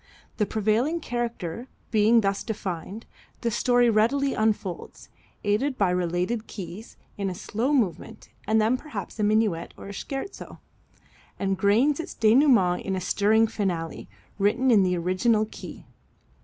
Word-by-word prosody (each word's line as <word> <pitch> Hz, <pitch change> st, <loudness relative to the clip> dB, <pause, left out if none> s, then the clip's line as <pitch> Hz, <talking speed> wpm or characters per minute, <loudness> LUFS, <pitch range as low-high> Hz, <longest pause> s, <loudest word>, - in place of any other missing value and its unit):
The 210 Hz, -, +1 dB
prevailing 220 Hz, +10 st, +1 dB
character 235 Hz, -, -4 dB, 0.2 s
being 225 Hz, +1 st, +4 dB
thus 195 Hz, -1 st, -1 dB
defined, 195 Hz, 0 st, -5 dB, 0.4 s
the 235 Hz, -, 0 dB
story 245 Hz, +1 st, +3 dB
readily 240 Hz, +6 st, +2 dB
unfolds, 215 Hz, -4 st, -2 dB, 0.3 s
aided 255 Hz, +7 st, 0 dB
by 195 Hz, -3 st, +2 dB
related 180 Hz, +6 st, -1 dB
keys, 190 Hz, +3 st, -9 dB, 0.2 s
in 195 Hz, -1 st, -1 dB
a 180 Hz, -, -5 dB
slow 230 Hz, +9 st, -2 dB
movement 225 Hz, -, -1 dB, 0.2 s
and 220 Hz, +3 st, +2 dB
perhaps 225 Hz, -, -7 dB
a -, -, +1 dB
minuet 210 Hz, -5 st, +1 dB
or 200 Hz, -, -9 dB
scherzo, 275 Hz, -, -6 dB, 0.8 s
and 195 Hz, -1 st, 0 dB
gains 230 Hz, -, +3 dB
its 330 Hz, -, -6 dB
denouement 225 Hz, -6 st, +4 dB
in 190 Hz, -, -2 dB
a -, -, -1 dB
stirring 215 Hz, +4 st, +3 dB
finale, 185 Hz, -7 st, -3 dB, 0.3 s
written 245 Hz, +6 st, +2 dB
in 215 Hz, -4 st, +6 dB
the 180 Hz, -1 st, +1 dB
original 185 Hz, +6 st, +1 dB
key. -, -, -10 dB
215 Hz, 135 wpm, -25 LUFS, 195-240 Hz, 0.8 s, in